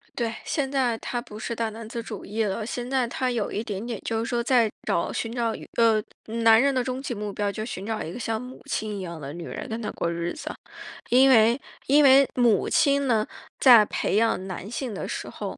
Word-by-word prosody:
对， 230 -2 -1
现 280 -3 -1
在 260 -4 +1
他 240 +1 -4
不 215 -4 -11
是 235 - -4
大 230 -1 -1
男 220 0 -9
子 230 +1 -5
主 220 -3 -7
义 220 +2 -1
了。 210 +1 -2
现 245 +2 -4
在 260 -2 +1
他 255 +2 -1
有 230 -4 -1
一 215 - -2
点 205 -3 -5
点 235 -4 -4
就 225 -1 -1
是 225 - -2
说 235 0 -1
在 235 -3 +3 0.2
找 170 - 0
寻 225 0 -3
找 235 -2 0 0.2
呃， 225 -2 +4 0.4
男 225 0 +7
人 280 0 +3
的 255 - +1
终 255 +1 -3
极 270 -2 -4
目 210 -2 -4
标， 205 +1 -1
就 215 - -5
寻 200 -4 -6
找 220 0 -3
一 160 - -6
个 215 - -7
像 225 -1 -2
母 250 +1 -10
亲 215 -1 -2
一 - - -5
样 170 -3 -6
的 135 - -6
女 170 +1 -7
人 - - -6
跟 225 +1 -4
他 210 - -3
过 170 - -2
日 170 0 -3
子。 - - -6 0.6
因 260 +2 +6
为 230 0 +5 0.3
因 290 +2 +6
为 270 0 +7
母 235 -6 +3
亲 280 -1 +3
呢， 220 -3 +2 0.3
在 235 -5 +8
培 - - -1
养 220 -4 +1
男 190 +1 -6
性 240 0 -4
的 190 - -5
时 - - -5
候， - - -6
230 Hz, 260 characters per minute, -25 LUFS, 210-250 Hz, 0.6 s, 在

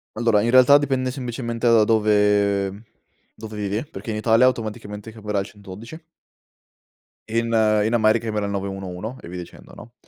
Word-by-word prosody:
Allora, 110 -2 +2
in 115 - 0
realtà 130 +3 +7
dipende 130 -3 -1
semplicemente 120 -2 -4
da 115 -2 +5
dove 105 -2 +1 0.5
dove 110 -1 -9
vivi, 105 +5 -3
perché 145 -6 -9
in 105 - -3
Italia 115 +3 +4
automaticamente 110 -2 -4
chiamerà 105 -2 -3
il 95 - -3
112 105 - -11 1.3
in 115 +1 -1 0.4
in 115 - 0
America 110 0 +2
verrà 105 -1 -2
il 100 - -3
911 95 +3 -5
e - - -11
via 90 +1 -7
dicendo, 90 - -11
no, 120 - -13
110 Hz, 155 wpm, -22 LUFS, 100-115 Hz, 1.3 s, realtà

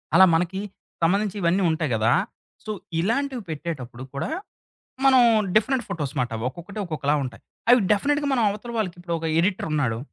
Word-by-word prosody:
అలా 190 - +9
మనకి. 180 +3 0 0.4
సంబంధించి 200 +4 +2
ఇవన్నీ 175 +3 +2
ఉంటాయి 160 -2 0
గదా! 110 +1 +2 0.5
సో, 215 - -4 0.3
ఇలాంటివి 250 +7 0
పెట్టేటప్పుడు 135 -6 -5
కూడా 140 - -2 0.8
మనం 260 -2 +7 0.3
డిఫరెంట్ 240 +2 +2
ఫోటోస్ 150 -8 -3
మాట. 125 -1 +1
అవి 110 - -5
ఒక్కొక్కటి 175 +9 -9
ఒక్కొక్కలా 150 -3 -1
ఉంటాయి. 125 -3 -8 0.3
అవి 250 - +8
డెఫినిట్‌గా 290 +7 +1
మన 255 - +2
అవతల 210 +4 -5
వాళ్ళకి 185 -5 -2
ఇప్పుడు 175 -1 -4
ఒక 165 - -4
ఎడిటర్ 185 +3 +1
ఉన్నాడు, 125 -7 0
175 Hz, 160 wpm, -24 LUFS, 145-215 Hz, 0.8 s, అలా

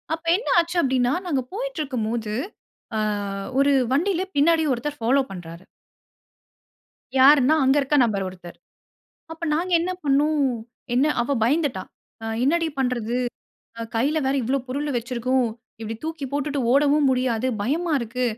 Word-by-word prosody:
அப்ப 325 - -18
என்ன 455 - -8
ஆச்சு 340 +1 -1
அப்டின்னா. 255 -1 +1
நாங்க 275 -6 0
போயிட்டு - - -4
இருக்கும் 250 -7 -2
போது, 225 -2 -3 0.6
அ - - 0 0.6
ஒரு 280 0 +4 0.2
வண்டில 360 +5 +1
பின்னாடி 320 +2 +4
ஒருத்தர் 290 +4 -4
ஃபாலோ 265 +4 +3
பண்றாரு. 175 -1 -9 1.6
யார்ன்னா, 280 +2 +6
அங்க 270 +2 +4
இருக்க 275 +2 -1
நபர் 200 -4 -1
ஒருத்தர். 180 -2 -11 0.8
அப்போ 325 +1 -6
நாங்க 355 +3 -1
என்ன 360 +2 -2
பண்னோம், 290 +2 +2 0.5
என்ன 270 +4 +3 0.2
அவ 280 +3 -1
பயந்துட்டா. 275 - +1 0.4
அ - - -5 0.2
என்னடி 330 +3 +2
பண்றது? 245 -2 -1 0.6
அ - - -3
கைல 290 +7 +1
வேற 270 - +1
இவ்வளோ 265 +4 0
பொருளு 290 +3 -2
வச்சிருக்கோம். 245 +1 0 0.3
இப்படி 225 0 -4
தூக்கி 320 -3 -4
போட்டுட்டு 285 0 -1
ஓடவும் 285 0 +4
முடியாது. 255 -2 0 0.2
பயமா 320 +7 -1
இருக்கு. 240 +2 -3
275 Hz, 140 wpm, -23 LUFS, 240-305 Hz, 1.6 s, யார்ன்னா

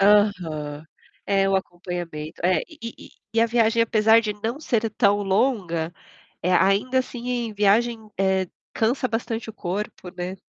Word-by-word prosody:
Aham. 175 -8 +2 0.4
É, 195 -1 +3
o 195 - +3
acompanhamento, 175 -4 -5
é. 185 0 +3
E 320 - -15
e 230 - -8 0.3
e 225 - +4
a 230 - +5
viagem 230 0 +3
apesar 225 0 +5
de 215 -2 -2
não 225 +7 -4
ser 230 -7 0
tão 205 -1 +3
longa, 190 -6 0 0.5
eh, 180 - +1
ainda, 195 +8 +3
assim, 250 -1 -4
em 240 -3 -1
viagem, 220 +2 +2
eh, 190 -1 +2 0.3
cansa 240 +4 +1
bastante 225 -1 -3
o - - -5
corpo, 190 -1 -5
né. 180 +1 -3
210 Hz, 155 wpm, -24 LUFS, 185-230 Hz, 0.5 s, a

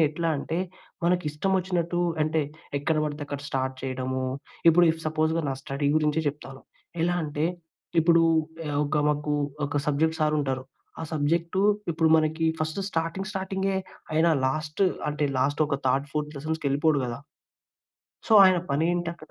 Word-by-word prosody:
నేనెట్లా 160 +2 +1
అంటే, 160 +4 -3 0.5
మనకిష్టమొచ్చినట్టు 175 +1 0 0.2
అంటే 155 0 +1 0.4
ఎక్కడ 155 +2 0
పడితే 150 0 -4
అక్కడ 145 -1 -5
స్టార్ట్ 130 0 -1
చేయడము. 130 0 -2 0.5
ఇప్పుడు 175 +2 +5 0.2
సపోజ్‌గా 160 +1 +1
నా 135 - -1
స్టడీ 140 0 -1
గురించే 150 +1 +1
చెప్తాను. 135 -2 -8 0.4
ఎలా 175 0 +1
అంటే, 150 +2 -1 0.6
ఇప్పుడు 165 0 +5 0.5
ఆహ్, 145 0 -1
ఒక 150 +1 -1
మాకు 150 0 -1 0.3
ఒక 145 0 -1
సబ్జెక్ట్ 160 +3 +1
సార్ 150 0 +2
ఉంటారు. 130 -2 -2 0.4
ఆ - - -4
సబ్జెక్టు 170 +5 0 0.3
ఇప్పుడు 160 0 +2
మనకి 160 +1 +1
ఫస్ట్ 155 +3 -2
స్టార్టింగ్ 165 +3 -2
స్టార్టింగే 190 0 -2 0.4
ఆయన 160 +2 +3 0.2
లాస్ట్ 155 +3 -3 0.3
అంటే, 150 0 -1
లాస్ట్ 145 +4 +2
ఒక 140 -2 -1
థర్డ్, 135 +2 +2
ఫోర్త్ 150 0 -3
లెసన్స్‌కి 155 0 -3
వెళ్ళిపోడు 145 +1 +2
కదా!... 120 -1 -4 1.1
సో, 220 - +4
ఆయన 185 -2 +6
పనేంటక్కడ 170 +2 -1
155 Hz, 140 wpm, -26 LUFS, 145-170 Hz, 1.1 s, ఆయన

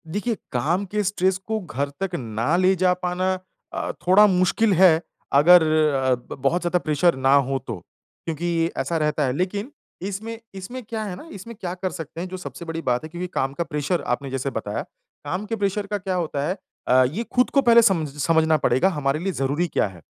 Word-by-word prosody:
देखिए, 210 +7 -2 0.2
काम 165 +11 0
के 210 0 0
स्ट्रेस 190 -1 +1
को 220 0 -1
घर 145 -7 -3
तक 190 -2 -2
ना 115 +2 -1
ले 185 +1 +4
जा 180 0 +3
पाना 180 +1 0 0.4
अ, - - -2 0.2
थोड़ा 195 +3 +7
मुश्किल 195 +3 +2
है, 170 -3 +6 0.3
अगर 165 +5 +7
अ, 150 -5 +2
ब 120 0 -10
बहुत 165 +7 +1
ज़्यादा 175 +1 +1
प्रेशर 160 +2 +2
ना 135 +1 +3
हो 135 -1 +2
तो। 115 -5 -4 0.5
क्योंकि 165 +1 -1
ऐसा 170 - -1
रहता 150 -1 +1
है, 125 - 0
लेकिन 200 - -2 0.4
इसमें 220 +3 -5 0.2
इसमें 195 +7 -7
क्या 220 0 -4
है 195 -4 -5
ना 250 - -11
इसमें 230 +5 -9
क्या 175 -1 -3
कर 185 0 -3
सकते 165 -1 -7
हैं 185 - -4
जो 185 +1 -6
सबसे 180 -1 -8
बड़ी 165 0 -4
बात 125 -3 0
है 155 - -7
क्योंकि 175 +2 -5
काम 135 +1 -1
का 170 - -2
प्रेशर 150 +2 -2
आपने 135 +3 -2
जैसे 135 +1 -2
बताया, 110 -3 -3 0.4
काम 185 +4 -3
के 225 - -2
प्रेशर 200 -1 -1
का 205 - -1
क्या 190 -1 -3
होता 150 -5 -1
है? 185 - -2 0.3
अ, 130 +1 +6
ये 215 +9 -3
खुद 250 0 +3
को 275 - +3
पहले 235 -2 +7
समझ 180 -9 +2
समझना 160 0 +3
पड़ेगा 130 +10 +3
हमारे 145 -4 -1
लिए 195 +3 -1
ज़रूरी 145 +5 0
क्या 155 - +1
है। 90 -3 -13
175 Hz, 210 wpm, -23 LUFS, 145-190 Hz, 0.5 s, थोड़ा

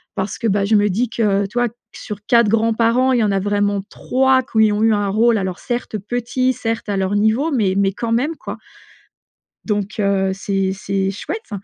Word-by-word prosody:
parce 190 +1 -3
que, 230 - -2
bah, 200 -1 +1
je 215 +2 +2
me 205 0 +3
dis 225 +6 0
que, 205 -3 +1
tu 210 - -9
vois, 245 0 +2 0.3
sur 210 - -7
4 235 -3 +4
grands-parents 230 +3 +2
il 245 - +2
y - - +2
en 210 - +1
a 195 - +1
vraiment 205 0 0
3 265 0 +2
qui 220 -4 +2
ont 210 +1 0
eu 225 0 +4
un 205 -1 0
rôle, 225 +3 +3
alors, 190 -2 -3
certes, 240 -3 -3
petit, 245 +4 -1
certes, 225 -2 -4
à 200 - 0
leur 190 +1 0
niveau, 220 +9 +2
mais 215 -9 +1
mais, 195 -1 +2
quand 230 +3 -4
même, 270 +8 0
quoi. - - -7 1.1
Donc, 205 -1 -2
heu, 195 -1 +1
c'est 195 0 -1
c'est 195 0 -2
chouette. 425 - -6
215 Hz, 205 wpm, -19 LUFS, 200-235 Hz, 1.1 s, 4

